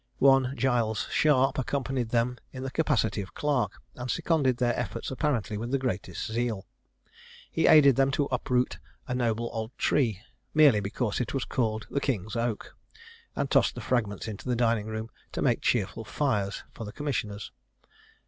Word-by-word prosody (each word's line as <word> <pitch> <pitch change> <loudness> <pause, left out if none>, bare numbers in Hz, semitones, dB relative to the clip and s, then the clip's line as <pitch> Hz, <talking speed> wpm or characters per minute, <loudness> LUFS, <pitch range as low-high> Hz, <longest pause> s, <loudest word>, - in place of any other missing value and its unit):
One 135 0 +4
Giles 115 -5 +1
Sharp 135 -3 +3
accompanied 130 -2 -1
them 120 +1 0
in 130 -1 -7
the 135 - -4
capacity 130 -10 +1
of 95 -2 -10
clerk, 145 -4 0
and 125 0 -6
seconded 140 -6 +1
their 120 -1 +1
efforts 115 0 -4
apparently 125 -7 -1
with 120 +2 -4
the 140 - +2
greatest 105 -9 -3
zeal. 115 -3 -1 0.9
He - - +2
aided 140 -5 +7
them 135 0 +4
to 145 - +2
uproot 125 0 0 0.3
a 125 - -2
noble 120 -2 0
old 110 +1 -5
tree, 110 -8 +1 0.3
merely 145 -8 +7
because 105 +2 -2
it 125 - -3
was 135 - -1
called 110 -3 -1
the 140 - 0
King's 110 -6 -2
Oak, 115 -2 -2 0.6
and 140 - -2
tossed - - +3
the - - -5
fragments 110 -4 -1
into 110 +3 -6
the 125 - +2
dining 115 -3 +1
room 110 +1 -5 0.2
to - - -2
make - - +2
cheerful 110 -1 0
fires 110 -6 -1
for 115 - -7
the 105 - -6
commissioners. 110 -6 -3
120 Hz, 165 wpm, -28 LUFS, 110-135 Hz, 0.9 s, aided